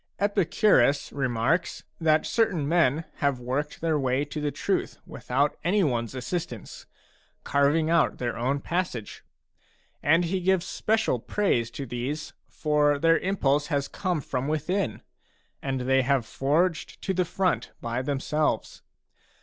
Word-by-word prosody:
Epicurus 195 - +3
a - - -14
remarks 130 +4 0 0.2
that 155 -1 +3
certain 185 -11 +1
men 160 -1 +2
have 140 -3 0
worked 130 +5 -3
their 160 -2 +1
way 130 +1 +1
to 150 +1 -5
the 150 - 0
truth - - -2
without 140 +4 -1
any 190 +4 +2
one's 120 -5 -1
assistance, 125 - -5 0.6
carving 145 +3 +2
out 165 0 +2
their 120 -1 -2
own 130 +4 0
passage. 160 - -3 0.8
And 165 +4 +3
he 185 +3 -1
gives 185 -1 +2
special 220 - 0
praise 120 - 0
to 140 - -4
these, 130 +5 -4 0.2
for 150 -1 +2
their 165 +3 +4
impulse 150 -7 +1
has 140 -3 -1
come 180 -6 -2
from 130 0 -3
within, 155 - -1 0.6
and 135 -2 -2
they 135 +1 +3
have 130 -2 +1
forged 155 +8 0
to 190 - 0
the 185 0 +2
front 180 +2 0
by 120 +2 -2
them 140 +1 -2
selves. 150 +2 -1
150 Hz, 140 wpm, -26 LUFS, 130-170 Hz, 0.8 s, their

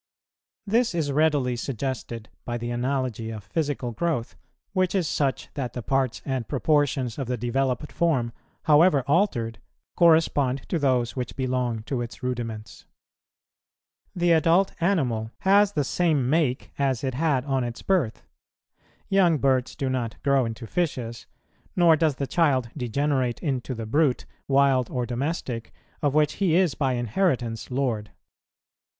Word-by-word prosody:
This 225 -1 +1
is 155 -4 0
readily 145 -4 +2
suggested 120 -2 -4 0.2
by 120 0 -3
the 120 0 -4
analogy 125 -2 -2
of 110 -3 -7
physical 140 +1 -2
growth, 125 -1 -2 0.4
which 185 0 +1
is 180 -4 +1
such 140 -3 -1
that 125 -4 -4
the 125 - -5
parts 135 0 0
and 130 -4 -2
proportions 140 -3 +1
of 135 - -3
the 125 0 -1
developed 125 +4 -1
form, 135 -9 +1 0.3
however 150 -2 +5
altered, 135 - +1 0.4
correspond 155 -6 +3
to 170 - 0
those 125 -4 +1
which 125 -2 -4
belong 125 -4 -1
to 125 +1 -3
its 120 +2 -7
rudiments. 115 -4 -5 1.3
The 175 -1 +2
adult 170 +4 +4
animal 130 - +1
has 200 +1 +4
the 150 - +1
same 150 -3 +1
make, 140 -3 0
as 135 -3 0
it 130 -1 -1
had 140 -2 +1
on 135 -3 0
its 120 -1 -6
birth; 165 - 0 0.8
young 185 -5 +4
birds 130 -2 +1
do 135 - -2
not 125 -4 -2
grow 140 -3 +3
into 115 +1 -5
fishes, 125 -6 -3 0.5
nor 170 -3 +6
does 155 -3 +1
the 140 - -2
child 135 -6 +1
degenerate 130 -1 0
into 130 -4 -2
the 115 -1 -5
brute, 140 +3 +1 0.2
wild 135 -3 +3
or 125 -2 -2
domestic, 125 -2 -3 0.3
of 145 -2 +1
which 150 -1 +3
he 175 -5 +3
is 180 -5 +3
by 135 -3 0
inheritance 120 - -1
lord. 125 -6 -1
135 Hz, 145 wpm, -25 LUFS, 120-155 Hz, 1.3 s, nor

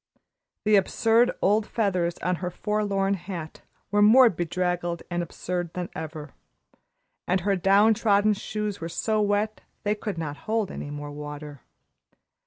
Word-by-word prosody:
The 210 -1 +5
absurd 225 +4 +3
old 210 +2 +3
feathers 185 -6 0
on 180 0 +1
her 180 0 -3
forlorn 200 0 0
hat 175 -4 -6 0.3
were 205 0 +3
more 240 +4 +8
draggled 175 -1 -2
and 175 0 0
absurd 175 0 -4
than 180 -1 -3
ever, 155 -2 -7 0.9
and 185 +1 +1
her 200 +2 +1
down 200 +4 +5
trodden 210 -1 +3
shoes 210 -1 -4
were 165 - -4
so 215 +5 0
wet 210 +1 0 0.2
they 210 -1 +1
could 210 -3 -5
not 150 -3 -4
hold 220 -3 0
any - - -6
more 145 0 -6
water. 150 -1 -8
190 Hz, 145 wpm, -26 LUFS, 170-210 Hz, 0.9 s, more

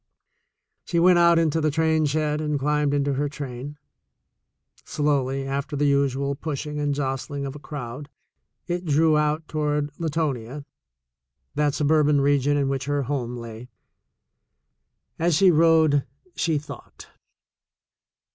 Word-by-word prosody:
She 170 - -2
went 175 0 +5
out 170 0 +5
into 160 -1 +1
the 155 - +2
train 160 0 +1
shed 150 +1 -1
and 150 -1 -1
climbed 150 +1 +1
into 140 0 0
her 145 +2 -1
train. 140 0 -7 1.1
Slowly, 135 -2 -1
after 140 +2 -3
the 145 +1 +1
usual 140 -1 +1
pushing 150 +1 -5
and 145 -1 0
jostling 140 +1 -3
of 135 - -5
a - - -8
crowd, 145 -1 -7 0.6
it 175 +1 -3
drew 155 0 +3
out 150 +1 0
toward 150 -1 -1
Latonia, 145 -5 -3 0.9
that 145 -1 0
suburban 150 -1 +3
region 145 +1 +2
in 140 -1 +1
which 135 -1 -2
her 145 0 -1
home 125 -2 -3
lay. 115 +1 -9 1.5
As 170 0 +2
she 185 +3 +5
rode, 160 -3 +4 0.3
she 160 -2 0
thought. 150 +1 -10
145 Hz, 130 wpm, -24 LUFS, 140-155 Hz, 1.5 s, went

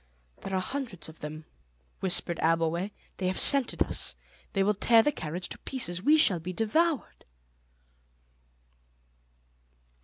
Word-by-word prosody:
"There 195 - -4
are - - +1
hundreds 230 - -4
of 160 - -15
them," 155 +1 -8 0.5
whispered 175 -2 0
Abbleway; 165 +3 +1 0.3
"they 185 - -2
have 185 - -1
scented 275 -4 +4
us. - - -1 0.4
They 195 -2 +2
will 210 +2 +2
tear 225 +3 +4
the 295 - +2
carriage 175 - -4
to - - -3
pieces. 180 -10 -1
We 300 +9 +5
shall 195 - +4
be 180 +3 -6
devoured." 285 - 0
190 Hz, 130 wpm, -28 LUFS, 170-235 Hz, 0.5 s, We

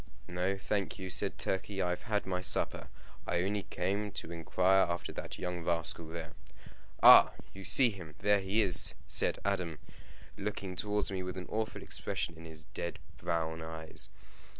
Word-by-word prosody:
"No, 90 +2 -1
thank 100 0 -2
you," 95 -2 -6
said - - -1
Turkey; 95 +1 -3
"I 90 -2 +1
have 90 - -3
had 105 -1 0
my 90 -1 -2
supper. - - +2 0.4
I 85 0 +1
only 100 +2 -1
came 100 +3 -2
to 85 - -7
inquire 90 +3 +2
after 85 0 -3
that - - -7
young 90 -1 -4
rascal 80 -1 -2
there." 80 0 -7 0.7
"Ah! - - +10 0.2
you 95 - -9
see 120 +6 +6
him! 85 -6 -10
There 105 +2 +3
he 100 +3 +1
is!" 90 -4 +7
said - - +3
Adam, 90 -6 -1 0.6
looking 100 -2 -4
towards 105 +1 -1
me 95 -1 -2
with 90 0 -5
an 90 - -5
awful 110 0 -3
expression 85 - -3
in 80 +1 -12
his 80 -1 -9
dead 85 - -4 0.2
brown 80 -1 -2
eyes. 80 -1 -5
90 Hz, 170 wpm, -32 LUFS, 85-100 Hz, 0.7 s, Ah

